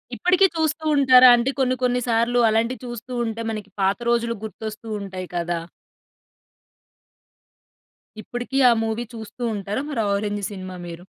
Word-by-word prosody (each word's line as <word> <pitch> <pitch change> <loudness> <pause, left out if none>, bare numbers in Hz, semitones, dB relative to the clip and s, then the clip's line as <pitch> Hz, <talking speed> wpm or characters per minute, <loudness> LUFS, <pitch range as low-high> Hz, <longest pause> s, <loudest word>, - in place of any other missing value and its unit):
ఇప్పటికి 365 +2 +4
చూస్తూ 315 -1 -1
ఉంటారా? 255 -2 +7
అంటే 240 +2 0
కొన్ని 255 -1 +2
కొన్ని 250 0 +2
సార్లు 235 +1 +2
అలాంటియి 225 +2 0
చూస్తూ 240 +1 -8
ఉంటే 225 0 -4
మనకి 210 -2 -6
పాత 195 +1 +2
రోజులు 235 -1 +1
గుర్తొస్తూ 220 +1 -7
ఉంటాయి 185 -2 -6
కదా! 170 0 -1 2.6
ఇప్పుటికీ 245 +4 -5
ఆ - - +6
మూవీ 225 +1 -2
చూస్తూ 225 +2 -8
ఉంటారా? 205 +4 -3
మరి 265 -6 -1
ఆరెంజ్ 205 0 -2
సినిమా 185 -2 -7
మీరు? 170 +1 -9
230 Hz, 135 wpm, -23 LUFS, 205-250 Hz, 2.6 s, ఉంటారా